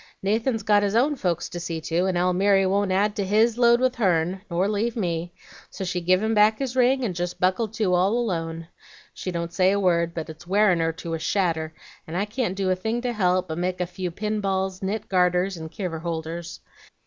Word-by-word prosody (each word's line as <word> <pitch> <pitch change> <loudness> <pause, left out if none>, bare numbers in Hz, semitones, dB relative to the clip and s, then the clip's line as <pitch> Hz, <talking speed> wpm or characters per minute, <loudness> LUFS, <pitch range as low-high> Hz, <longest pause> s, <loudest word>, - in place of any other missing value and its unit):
Nathan's 225 +3 0
got 205 0 +4
his 205 +1 0
own 280 +6 +3
folks 175 - -1
to 175 - -6
see 170 -1 -4
to, 170 +3 0
and 185 -2 0
Almiry 190 +2 +3
won't 195 +1 +1
add 205 +2 +1
to 200 - 0
HIS 220 +4 +2
load 235 0 +5
with 255 0 +2
hern, 185 -3 +1
nor 180 +2 +1
leave 215 +3 -1
me; 175 -5 -2 0.4
so - - -6
she 180 -1 -2
give 185 +3 +2
him 220 +1 +1
back 215 +1 +4
his 260 -2 -3
ring, 260 +1 +3
and 210 -6 -1
jest 175 0 -4
buckled 190 +4 +1
to 210 -5 +1
all 190 +6 +3
alone. 165 -7 -3 0.5
She - - -5
don't 170 -1 -4
say 185 +1 +3
a 200 - +1
word, 170 -3 +1
but 160 - -4
it's 160 +2 -11
wearin' 195 -2 +3
her 165 0 +1
to 165 +1 -6
a 165 - -2
shadder, 160 -3 -1 0.3
and 165 +2 -4
I 200 - +1
can't 215 -2 -2
do 195 -1 0
a - - +2
thing 220 +6 -2
to 245 -1 -2
help, 185 -3 +1
but 160 +1 -3
make 180 0 -2
a 180 - 0
few 180 +1 -5
pinballs, 195 -1 -2
knit 205 +3 -3
garters, 180 0 +2
and 160 -1 -7
kiver 180 -5 -4
holders. 165 +1 -5
185 Hz, 220 wpm, -24 LUFS, 175-210 Hz, 0.5 s, load